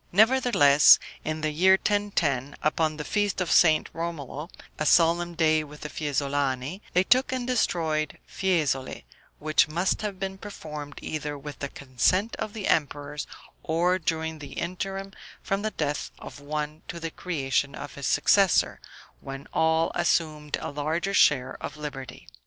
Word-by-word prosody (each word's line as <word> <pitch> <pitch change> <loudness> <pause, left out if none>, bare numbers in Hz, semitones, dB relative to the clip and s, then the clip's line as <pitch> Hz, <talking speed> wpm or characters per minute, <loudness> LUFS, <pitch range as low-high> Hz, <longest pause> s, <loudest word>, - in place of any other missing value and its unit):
Nevertheless, 215 - +6 0.3
in 155 0 -3
the 155 0 0
year 185 +5 +5
1010, 180 - 0
upon 155 0 +1
the 150 - -4
feast 205 -2 0
of 180 -2 -1
St. 155 -3 +5
Romolo, 165 -2 -5 0.3
a 155 - 0
solemn 170 +1 +3
day 155 -1 +3
with 150 0 -12
the 150 - -5
Fiesolani, 140 +2 -2
they 180 - +4
took 255 +7 +3
and 255 -1 -2
destroyed 160 - 0
Fiesole, 155 -9 -1 0.3
which 155 +1 +2
must 175 +5 0
have 205 -3 -4
been 190 0 -4
performed 150 -8 -8
either 150 -1 -4
with 145 +1 -9
the 140 - -4
consent 140 - 0
of 210 - -4
the 210 -4 -4
emperors, 145 -1 -1 0.3
or 175 +3 +1
during 160 -1 -2
the 140 -2 -9
interim 195 +2 -4 0.3
from 195 +1 -1
the 215 - -1
death 150 -7 -3
of - - -10
one 150 +1 -4
to 170 - -6
the 165 -1 -4
creation 140 -5 -1
of 145 -2 -8
his 140 - -4
successor, 195 -3 +3 0.4
when 135 +1 -8
all 160 0 +2
assumed 150 -3 0
a - - -4
larger 160 +7 -2
share 130 -8 +4
of - - -6
liberty. 140 -3 -8
155 Hz, 150 wpm, -26 LUFS, 145-185 Hz, 0.4 s, Nevertheless